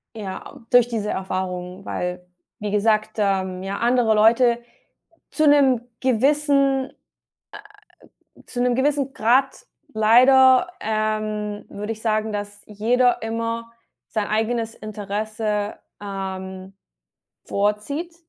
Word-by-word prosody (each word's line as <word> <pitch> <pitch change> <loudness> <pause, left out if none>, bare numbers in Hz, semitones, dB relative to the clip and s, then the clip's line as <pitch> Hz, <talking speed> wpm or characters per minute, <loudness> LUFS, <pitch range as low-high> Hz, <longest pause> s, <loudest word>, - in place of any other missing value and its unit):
Ja, 200 -4 -5
a 275 -5 -14
durch 245 -2 +6
diese 220 -3 -3
Erfahrung, 185 0 -4
weil, 180 0 -4 0.3
wie 210 -1 -4
gesagt, 215 +1 +1
ähm, 190 -3 0
ja, 195 +1 -4
andere 240 -2 +2
Leute 235 +2 +4 0.7
zu 310 -1 +2
'nem 275 -5 +5 0.2
gewissen, 275 +1 +2 1.5
äh - - -19
zu 245 - -5
'nem 245 0 +2
gewissen 275 +1 0
Grad 260 +4 +1 0.3
leider, 255 +6 +6
ähm, 215 -1 -2
würde 210 +2 -5
ich 220 -1 -10
sagen, 215 -1 0
dass 205 0 -6
jeder 240 +4 +1
immer 230 +1 -3 0.4
sein 215 -3 -2
eigenes 225 +1 -1
Interesse, 210 0 -3 0.3
ähm, 190 -1 -6 0.7
vorzieht. 215 - -2
220 Hz, 110 wpm, -22 LUFS, 205-245 Hz, 1.5 s, durch